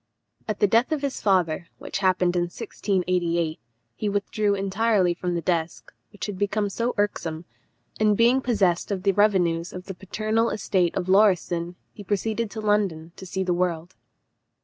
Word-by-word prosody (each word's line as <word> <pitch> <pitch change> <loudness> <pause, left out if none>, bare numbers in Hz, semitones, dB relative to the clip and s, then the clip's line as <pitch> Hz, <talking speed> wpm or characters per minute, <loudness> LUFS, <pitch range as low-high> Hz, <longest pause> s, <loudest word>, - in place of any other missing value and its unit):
At 215 -2 -3
the - - +5
death 230 +7 +3
of 300 -2 -1
his 280 -2 -2
father, 180 -4 +1
which - - -5
happened 185 -2 +2
in 175 -1 +2
1688, 175 -4 -1 0.4
he 210 - -2
withdrew 205 0 0
entirely 195 -1 +1
from 175 0 -3
the 170 - -1
desk, 170 0 -2 0.2
which 205 - -6
had 205 -3 -6
become 205 0 0
so 235 +4 -1
irksome, 170 -5 -2 0.5
and 210 -1 +3
being 240 +3 +4
possessed 200 -9 +1
of 195 -3 -3
the 200 - +4
revenues 180 -5 +2
of 180 0 -8
the 195 - -6
paternal 215 +5 -1
estate 190 -4 0
of 185 -1 -2
Lauriston, 180 -3 +2 0.2
he 205 - -10
proceeded 215 +3 -1
to 220 - -6
London, 195 -6 0
to 190 - -10
see 190 +2 -2
the 180 -1 0
world. 175 -1 -1
195 Hz, 170 wpm, -25 LUFS, 175-210 Hz, 0.5 s, the